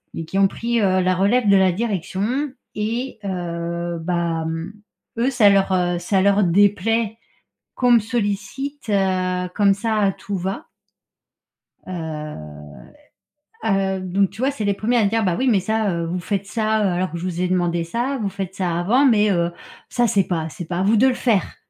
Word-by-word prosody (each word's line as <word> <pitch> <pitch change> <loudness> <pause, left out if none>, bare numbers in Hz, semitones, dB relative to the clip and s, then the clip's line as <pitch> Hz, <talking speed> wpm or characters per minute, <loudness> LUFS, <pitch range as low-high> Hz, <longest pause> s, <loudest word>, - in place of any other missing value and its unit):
et 165 - -4
qui 190 - -4
ont 195 - +6
pris, 235 -1 -1
heu, 185 -1 +3
la 185 0 +2
relève 210 +5 +2
de 200 - +6
la 190 -1 +4
direction 210 - -2 0.3
et 230 +4 -3
heu, 170 -2 -3
bah, 170 -1 -1
hem, 165 +5 -4 0.4
eux 245 +3 +2
ça 230 -6 +5
leur, 195 -1 +3
heu, 175 -1 +1
ça 190 +2 +1
leur 200 +1 +4
déplaît 205 +4 +2 0.6
qu'on 245 -1 +2
me 235 - +7
sollicite, 225 +5 -3
heu, 185 -2 0
comme 200 -1 +4
ça, 220 +2 -1
à 200 -2 +3
tout-va. 190 0 -4 1.2
Heu, 150 - -7 0.8
heu, 195 -1 +1
donc 185 +1 0
tu 200 +4 -11
vois, 270 +2 +2
c'est 225 -7 -5
les 200 -1 +1
1ers 230 +5 0
à 210 - +3
dire: 225 +1 +1
«Bah 180 -2 +1
oui, 260 0 +1
mais 205 -5 +3
ça, 215 +1 0
heu, 170 -1 -2
vous 175 +2 -3
faites 195 +1 -3
ça, 215 0 0
heu, - - +3
alors 180 0 -1
que 170 - -4
je 175 - -6
vous 180 -1 -3
ai 180 - +1
demandé 175 -2 0
ça, 245 +9 -2
vous 200 - 0
faites 195 -1 -5
ça 175 -3 -1
avant, 240 +11 +3
mais, 210 -4 +4
heu, 170 -2 +1 0.4
ça, 240 -1 +1
c'est 200 -3 +2
pas 160 -3 -2
c'est 175 - -7
pas 175 +1 -3
à - - +1
vous 215 +3 +3
de 260 +5 +5
le 255 - +1
faire». 225 -7 0
195 Hz, 195 wpm, -21 LUFS, 175-220 Hz, 1.2 s, me